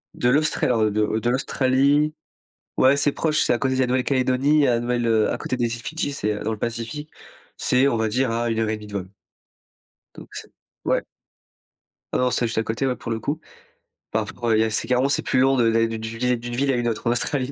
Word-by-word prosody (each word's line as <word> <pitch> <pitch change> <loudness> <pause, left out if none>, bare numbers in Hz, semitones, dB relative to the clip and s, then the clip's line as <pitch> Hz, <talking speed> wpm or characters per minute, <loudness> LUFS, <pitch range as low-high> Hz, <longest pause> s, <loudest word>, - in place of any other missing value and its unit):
De 120 - +1
l'Austra 155 +4 +2
alors 115 -3 +2
de 105 +1 0
de 120 - -1
l'Australie. 140 +4 +2 0.6
Ouais 135 +2 +5
c'est 145 0 +3
proche, 155 0 +1
c'est - - +2
à 120 - -1
côté 130 -1 0
de 130 - -1
la 125 - +2
Nouvelle-Calédonie, 130 +3 +2
la 120 -2 +2
Nouvelle 120 0 -1
heu 110 -2 +2
à - - -2
côté 130 - -3
des 120 - +1
îles 115 - -9
Fidji, 160 -1 -3
c'est, 105 -6 -1
heu, 105 - -5
dans 110 - -1
le 110 - -3
Pacifique, 115 +7 -5 0.4
c'est 130 +2 +3
on 120 - +1
va 110 0 0
dire 125 +2 0
à 115 +1 -1
1 115 0 -1
heure 110 -1 0
et 110 - 0
1/2 105 0 -11
de 105 - -12
vol 95 -2 -4 1.1
donc - - -11
c'est - - -8 0.3
ouais. - - +1 1.1
Ah - - +2
non, 125 -1 +1
c'était 120 - +1
juste 115 - -4
à 110 - +2
côté 115 +5 -2
ouais 125 - 0
pour 115 - -7
le 110 - -2
coup. 145 +8 -3 0.7
Enfin, - - 0
f - - -8
re 120 -2 0
il - - +3
y - - +4
a 110 - 0
c'est - - 0
carrément 130 +2 +2
c'est 145 - +2
plus 130 - 0
long 135 +1 +4
de 115 -2 +3
d'aller 115 0 +2
d'une 110 -1 -5 0.2
vué 125 0 +2
d'une 120 +1 -6
ville 135 +1 +1
à - - +1
une 120 -1 -1
autre 110 -1 -3
en - - +3
Australie 130 +2 -1
125 Hz, 255 wpm, -23 LUFS, 115-135 Hz, 1.1 s, Ouais